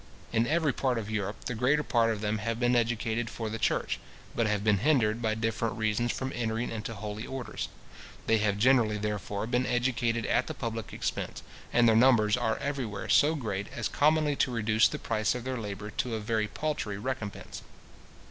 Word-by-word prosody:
In 115 +1 +2
every 155 -2 +2
part 130 -3 0
of 110 -1 -4
Europe, 105 -1 -3
the 125 - -2
greater 130 +6 +2
part 115 -4 +2
of 105 -2 -3
them 105 0 -1
have 115 +2 -2
been 120 0 +3
educated 115 -1 0
for 110 -2 -4
the 115 - -4
church, - - 0 0.4
but 115 -2 +2
have 105 -1 0
been 105 -2 +3
hindered 120 -5 +2
by 110 -1 +1
different 115 0 -1
reasons 110 +2 +1
from 130 0 -3
entering 115 0 -2
into 115 0 -5
holy 105 +1 -5
orders. 130 -2 -5 0.6
They 115 -1 +3
have 105 -1 +1
generally, 115 -2 +4
therefore, 105 -1 -3
been 125 +2 0
educated 120 -2 0
at - - +1
the - - -5
public 115 -2 -4
expense; - - -4 0.3
and 120 0 +5
their 110 - +5
numbers 110 -3 +5
are 115 -2 0
everywhere 125 -9 -3
so 155 +3 +5
great, 105 -8 -3
as - - -1
commonly 150 0 +2
to - - +2
reduce 110 -2 +3
the - - -4
price 110 0 0
of 125 - -4
their 130 0 -3
labour 105 -1 -5
to 115 +2 -2
a - - -2
very 110 0 0
paltry 110 -5 -3
recompence. 110 -2 -5
115 Hz, 195 wpm, -29 LUFS, 105-125 Hz, 0.6 s, and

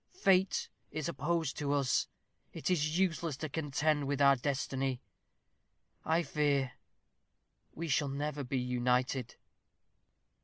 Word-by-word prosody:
Fate 190 - +3 0.2
is 155 -2 -3
opposed 165 -1 -1
to 145 -1 0
us. 140 -2 +2 0.5
It - - -2
is 155 -2 +1
useless 170 -5 0
to 155 0 -4
contend 145 0 0
with 140 0 -1
our 140 -1 +7
destiny. 135 -1 -1 1.0
I 165 +2 +2
fear 140 -3 +1 1.0
we 165 +1 -4
shall 145 -1 +1
never 145 +1 -3
be 130 +1 -2
united." 125 0 0
145 Hz, 115 wpm, -33 LUFS, 135-160 Hz, 1.0 s, our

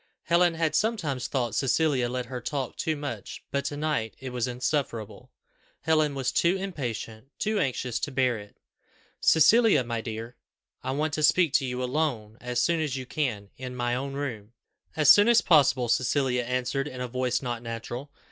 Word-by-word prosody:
Helen 170 0 +3
had 160 -1 0
sometimes 155 - 0
thought 120 -5 -1
Cecilia 135 -1 +1
let 125 0 -3
her 125 0 -6
talk 135 0 -3
too 160 - -1
much, 145 -1 -6
but 140 0 0
to 145 - -3
night 150 -8 -1
it 130 -1 -7
was 125 0 -1
insufferable. 125 -3 -3 0.5
Helen 155 -3 +2
was 130 -2 -1
too 170 +7 +2
impatient, 130 - -5
too 215 0 0
anxious 125 - -1
to 145 - -3
bear 130 -3 +1
it. 105 0 -14 0.6
"Cecilia, 195 - +5
my 115 -1 -3
dear, 115 +1 -6 0.5
I 130 - -3
want 145 +3 -1
to 155 - -1
speak 160 0 +4
to 135 -4 +2
you 125 0 -3
alone, 125 -6 -2
as 125 0 -2
soon 170 -1 +2
as 145 -4 -1
you 130 - -5
can, 120 -9 -3
in 125 0 -6
my 120 -1 -1
own 135 +2 -3
room." 120 -6 -5 0.4
"As 150 -2 +7
soon 205 +6 +7
as 235 -1 +6
possible," 135 -6 +4
Cecilia 125 +1 +1
answered 125 +3 -1
in 130 -3 -8
a 125 - -2
voice 125 +1 -1
not 120 -2 -3
natural. 120 +4 -6
130 Hz, 180 wpm, -27 LUFS, 120-155 Hz, 0.6 s, As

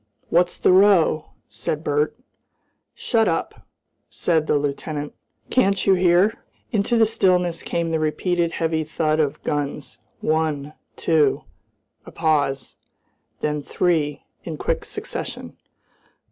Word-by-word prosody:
"What's 175 +1 +2
the - - +3
row?" 185 -5 +4 0.2
said 120 +8 -4
Bert. 150 0 0 0.8
"Shut 225 -3 +1
up!" 165 - -3 0.4
said 160 -3 0
the 150 - +3
lieutenant. 145 +1 -3 0.4
"Can't 195 -6 +2
you 195 - +5
hear?" 180 +3 +3 0.3
Into 220 +1 +1
the 225 - +6
stillness 180 -5 +1
came 170 -1 -2
the 160 - +1
repeated 165 +2 0
heavy 160 -1 0
thud 155 0 0
of 145 -3 -1
guns, 145 -5 -3 0.2
one, 155 -2 -1 0.2
two, 155 -4 +2 0.6
a - - -11
pause, 145 -5 0 0.6
then 150 0 -1
three 150 -3 0 0.2
in 160 -3 -6
quick - - -2
succession. - - -6
160 Hz, 120 wpm, -22 LUFS, 150-180 Hz, 0.8 s, the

